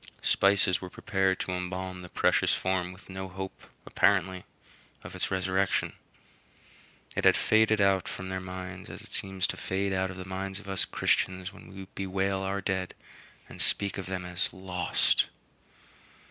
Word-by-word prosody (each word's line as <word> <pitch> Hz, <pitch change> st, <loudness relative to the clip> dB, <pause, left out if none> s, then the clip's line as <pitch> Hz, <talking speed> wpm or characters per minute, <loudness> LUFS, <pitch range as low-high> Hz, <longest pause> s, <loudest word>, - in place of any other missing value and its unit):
Spices 100 Hz, -2 st, +3 dB
were 90 Hz, -, -6 dB
prepared 95 Hz, -1 st, 0 dB
to -, -, -3 dB
embalm 90 Hz, 0 st, -4 dB
the 90 Hz, -, -9 dB
precious -, -, +3 dB
form 95 Hz, -1 st, 0 dB
with 90 Hz, +2 st, -14 dB
no 95 Hz, 0 st, -5 dB
hope, 95 Hz, +1 st, -7 dB, 0.2 s
apparently, 95 Hz, -1 st, +2 dB, 0.6 s
of -, -, -9 dB
its -, -, -2 dB
resurrection. 95 Hz, 0 st, +1 dB, 1.2 s
It -, -, -1 dB
had -, -, +6 dB
faded 110 Hz, 0 st, +4 dB
out 95 Hz, -2 st, +3 dB
from 95 Hz, 0 st, -5 dB
their 95 Hz, 0 st, -2 dB
minds 95 Hz, 0 st, -7 dB
as -, -, -8 dB
it -, -, -10 dB
seems 95 Hz, -1 st, +3 dB
to -, -, -2 dB
fade 95 Hz, +1 st, -1 dB
out 95 Hz, 0 st, +1 dB
of 90 Hz, -, -7 dB
the 90 Hz, -, -6 dB
minds 95 Hz, +1 st, -4 dB
of 105 Hz, -, -14 dB
us 95 Hz, -1 st, +3 dB
Christians 95 Hz, +1 st, 0 dB
when 100 Hz, -, -13 dB
we 95 Hz, 0 st, -9 dB
bewail 95 Hz, 0 st, -1 dB
our 95 Hz, +1 st, -2 dB
dead 95 Hz, -1 st, -2 dB, 0.5 s
and -, -, -3 dB
speak 100 Hz, -1 st, +1 dB
of 95 Hz, -, -6 dB
them 95 Hz, -1 st, -3 dB
as 90 Hz, 0 st, 0 dB
"lost." 95 Hz, -1 st, +1 dB
95 Hz, 165 wpm, -29 LUFS, -, 1.2 s, had